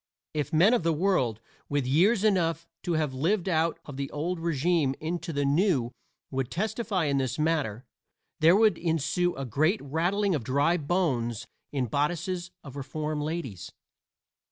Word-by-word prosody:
If 150 0 -2
men 175 +8 +5
of 245 - +3
the 165 0 +1
world 150 - +1 0.3
with 145 -2 0
years 190 - +3
enough 165 -6 +1
to 175 - -2
have 155 -4 0
lived 175 +8 0
out 165 -2 +1
of 140 -3 -8
the 140 0 -3
old 165 +4 -3
régime 165 -3 +1
into 165 +1 -3
the 145 -2 0
new 140 - +2 0.4
would 130 -2 -2
testify 215 -1 -1
in 140 -1 +1
this 130 -2 -1
matter 150 -7 0 0.5
there 165 +4 +6
would 215 0 +4
ensue 170 +2 0
a 135 - -4
great 155 - +1
rattling 180 +8 0
of 145 -7 -1
dry 140 +7 +2
bones 140 - -1 0.3
in 135 -3 0
bodices 175 - -1
of 140 -2 -10
reform 150 +2 -3
ladies. 150 - -5
160 Hz, 155 wpm, -28 LUFS, 140-175 Hz, 0.5 s, there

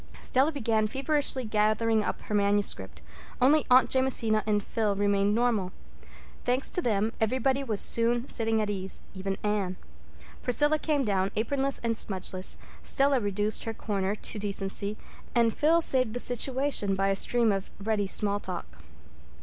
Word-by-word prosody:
Stella 270 +5 +1
began 225 -6 0
feverishly 270 +1 +1
gathering 215 +1 +1
up - - -4
her - - -7
manuscript. 200 - 0 0.4
Only 285 +4 +3
Aunt 255 +1 +5
Jamesina 240 -5 +2
and 210 -1 +1
Phil 215 -3 -1
remained 200 0 +1
normal. 225 -6 0 0.7
Thanks 250 +2 0
to 360 - 0
them, 220 - 0
everybody 260 +4 +1
was 220 -6 -2
soon 235 +2 +4
sitting 225 -1 0
at 210 - -3
ease, 190 -1 -2
even 195 0 -4
Anne. 200 -3 -1 0.6
Priscilla 295 +5 +2
came 295 -4 0
down, 195 -2 0
apronless 275 +5 -1
and 230 -1 0
smudgeless, 190 -2 -2 0.2
Stella 275 -1 +2
reduced 205 0 -1
her 225 -1 -4
corner 200 -2 -2
to 215 - -6
decency, 200 0 -2 0.4
and 230 -2 +3
Phil 325 +3 +3
saved 255 -7 +2
the - - -2
situation 250 -4 +1
by 195 +1 0
a 195 - +1
stream 235 +2 +2
of 195 0 -3
ready 205 -1 -1
small 205 +1 +1
talk. 175 - -7
220 Hz, 150 wpm, -27 LUFS, 200-255 Hz, 0.7 s, Aunt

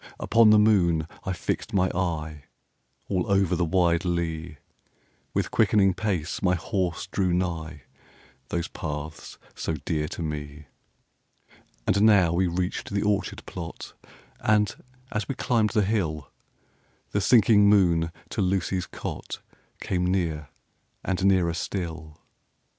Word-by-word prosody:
Upon 115 -1 +5
the 105 - +7
moon 90 -7 +3 0.2
I 95 - -1
fixed 100 +5 -3
my 95 -1 +3
eye, 80 -5 -3 0.6
All 95 0 -1
over 95 -2 +3
the 90 - 0
wide 85 0 +2
lea; 85 -2 -2
10 - - -20 0.8
With - - 0
quickening 95 -3 +4
pace 90 -5 -2
my 90 -1 +3
horse 90 0 -2
drew 95 -1 0
nigh 80 -5 -3 0.7
Those 85 0 -2
paths 75 -1 -6 0.2
so 80 - -3
dear 75 -1 -1
to 85 - -5
me. 75 -1 -5 1.2
And 100 - +2
now 100 -6 +5
we 90 +2 +2
reached 90 +1 -2
the 100 0 -1
orchard 105 -1 -1
plot; 85 -1 -8 0.5
And, 105 -1 +2 0.4
as 105 -2 -2
we 135 - -3
climbed 115 -4 +1
the 105 -1 +1
hill, 80 -9 -2 0.8
The 100 - 0
sinking 105 -2 +5
moon 85 -5 +3 0.2
to - - -2
Lucy's 95 -1 0
cot - - -6 0.4
Came 90 -1 0
near, 80 -5 -1 0.5
and 95 -1 -1
nearer 95 -4 +3
still. 80 -3 -5
90 Hz, 130 wpm, -26 LUFS, 80-100 Hz, 1.2 s, the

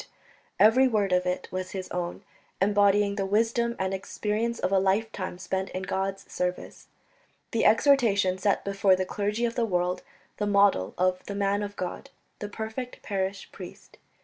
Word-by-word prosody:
Every 245 +5 +6
word 210 -5 +1
of 180 0 +2
it 180 - -2
was 185 0 -4
his 185 -1 -5
own, 175 -1 -4 0.4
embodying 205 0 +3
the 195 - 0
wisdom 230 +3 +1
and 190 0 -1
experience 215 +4 -2
of 185 - -1
a 195 - +4
lifetime 195 -1 -1
spent 190 +1 -3
in 185 - -3
God's 195 0 -2
service. 180 0 -4 0.6
The 230 - +1
exhortation 215 -6 +4
set 200 0 +1
before 195 -1 +3
the 185 0 -1
clergy 210 +5 -1
of 230 - -1
the 240 - 0
world 180 -4 0 0.4
the 210 - -1
model 200 - +3
of 185 0 +1
"the 200 - -4
man 200 0 +1
of 205 0 -5
God" 180 -2 -5 0.3
the 205 - -5
perfect 220 +4 -6
parish 195 0 -3
priest. - - -12
200 Hz, 165 wpm, -27 LUFS, 185-215 Hz, 0.6 s, Every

